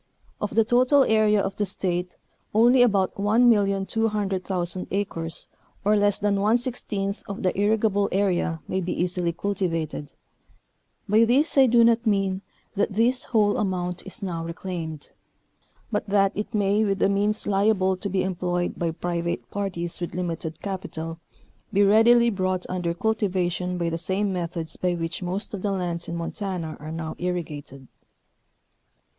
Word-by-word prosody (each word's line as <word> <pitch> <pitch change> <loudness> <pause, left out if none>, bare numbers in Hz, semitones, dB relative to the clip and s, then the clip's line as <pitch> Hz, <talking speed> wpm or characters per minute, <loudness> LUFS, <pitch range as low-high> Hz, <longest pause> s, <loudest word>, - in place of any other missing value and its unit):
Of 210 - -3
the 225 -1 +4
total 255 +4 +4
area 215 -3 +3
of 195 0 -2
the 205 - +1
State 180 -1 -2 0.4
only 240 +3 +6
about 200 -6 +3
1,200,000 200 -4 +1
acres 170 -5 -3 0.4
or 210 +1 +4
less 205 -1 +3
than 200 -1 0
one 215 +4 +4
sixteenth 210 -5 -2
of 200 +1 -6
the 185 - +1
irrigable 205 0 +2
area 180 -4 0
may 190 - -1
be 180 0 -3
easily 180 -1 0
cultivated, 165 -6 -3 0.9
by 215 +3 +5
this 270 +7 +3
I 270 -2 +6
do 235 0 +5
not 230 0 +3
mean 195 -2 +1 0.3
that 200 - 0
this 240 +5 +2
whole 210 -3 +2
amount 180 -3 -2
is 190 - -7
now 170 -4 -3
reclaimed, 165 -2 -6 0.8
but 210 -1 -1
that 195 -1 +2
it 210 +3 -4
may 205 0 +2
with 200 -2 0
the - - +3
means 205 +2 +1
liable 195 -1 +2
to 200 +2 -4
be 185 -1 0
employed 180 -1 -2
by 170 - 0
private 170 +1 -3
parties 180 -4 -3
with 175 - -4
limited 165 -3 -4
capital, 165 -4 -5 0.5
be 205 -1 +4
readily 235 +3 +5
brought 185 -2 -1
under 175 -2 -2
cultivation 180 -4 -1
by 170 -1 -1
the 165 - -2
same 195 +3 -1
methods 170 -2 -3
by 180 -1 0
which 165 +1 -3
most 185 +4 -3
of 200 - -4
the 205 - -1
lands 175 -3 -2
in 170 - -4
Montana 170 -1 -4
are 155 +1 -7
now 160 -1 -5
irrigated. 150 -7 -5
195 Hz, 150 wpm, -25 LUFS, 175-210 Hz, 0.9 s, only